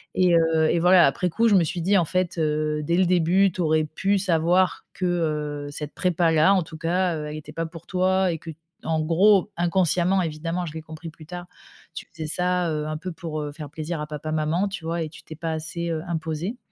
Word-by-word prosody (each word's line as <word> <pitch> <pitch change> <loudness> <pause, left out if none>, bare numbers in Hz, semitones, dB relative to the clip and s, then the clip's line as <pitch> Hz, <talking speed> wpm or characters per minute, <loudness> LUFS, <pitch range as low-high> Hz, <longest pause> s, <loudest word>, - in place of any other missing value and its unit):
Et 180 -2 +4
heu, 160 -1 +3
et 170 - +2
voilà, 180 0 +6
après 180 +6 0
coup, 230 +7 +2
je 210 - +5
me 180 - +5
suis 170 +2 -3
dit: 195 +4 +3
«En 175 - +3
fait, 180 +1 -1
heu, 150 -1 0
dès 170 +3 +1
le 185 - +4
début, 180 +2 +3
tu 180 - -4
aurais 155 -1 +2
pu 195 +6 0
savoir 180 0 +1
que, 185 - -3
heu, 150 -4 -1
cette 150 0 -6
prépa 175 -2 +1
là, 160 +5 +5
en 190 -3 +2
tout 160 0 -10
cas, 175 +2 0
heu, 150 -1 -4
elle 150 - -6
était 150 0 -10
pas 165 +1 -2
pour 165 0 -10
toi». 185 0 +2
Et 165 - -3
qu'en 160 0 -5
gros 190 +6 +4
inconsciemment, 175 +1 +2
évidemment, 165 +2 -3
je 155 - -7
l'ai 160 - -6
compris 160 +1 -9
plus 160 0 -14
tard. 175 +2 -7 0.5
«Tu - - -7
faisais 160 -2 -6
ça, 180 +1 0
heu, 150 -1 -2
un 155 - -3
peu 180 +4 -6
pour, 160 -2 -5
heu, 145 -1 -4
faire 150 -1 -8
plaisir 155 +2 -5
à 150 - -4
papa, 155 +1 -5
maman, 160 +5 0
tu 195 -4 -6
vois? 165 +1 -2
Et 155 - -5
tu - - -14
t'es 160 - -10
pas 165 +1 -4
assez, 165 +2 -4
heu, 160 -1 -2
imposée, 165 +6 -3
165 Hz, 235 wpm, -24 LUFS, 155-180 Hz, 0.5 s, voilà